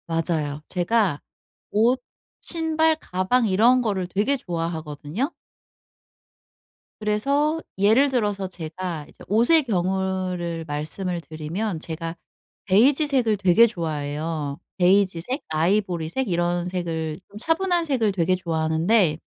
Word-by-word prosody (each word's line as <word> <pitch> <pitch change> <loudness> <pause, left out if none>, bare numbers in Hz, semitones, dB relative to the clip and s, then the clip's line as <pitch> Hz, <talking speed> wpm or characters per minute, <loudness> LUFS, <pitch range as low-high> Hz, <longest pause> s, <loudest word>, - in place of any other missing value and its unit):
맞아요. 160 -3 -1
제가 185 -3 +1 0.5
옷, 235 +5 +3 0.4
신발, 320 -1 +2
가방 190 +5 +1
이런 230 +6 +4
거를 195 -6 -1
되게 210 +10 +1
좋아하거든요. 165 - -4 1.7
그래서 280 +9 +1 0.2
예를 220 +8 +4
들어서 205 -6 0
제가 170 -2 -6
이제 - - -16
옷의 240 - +4
경우를 185 -4 -1
말씀을 170 +4 -3
드리면 160 +5 -4
제가 165 +1 -5 0.5
베이지색을 255 - +3
되게 195 +4 +6
좋아해요. 155 -5 -3 0.2
베이지색, 190 - +2
아이보리색 175 +6 0
이런 175 0 0
색을 165 -3 -3
좀 205 - -12
차분한 345 - +1
색을 250 -8 +1
되게 185 -1 +1
좋아하는데 165 +1 +1
185 Hz, 260 characters per minute, -24 LUFS, 165-230 Hz, 1.7 s, 되게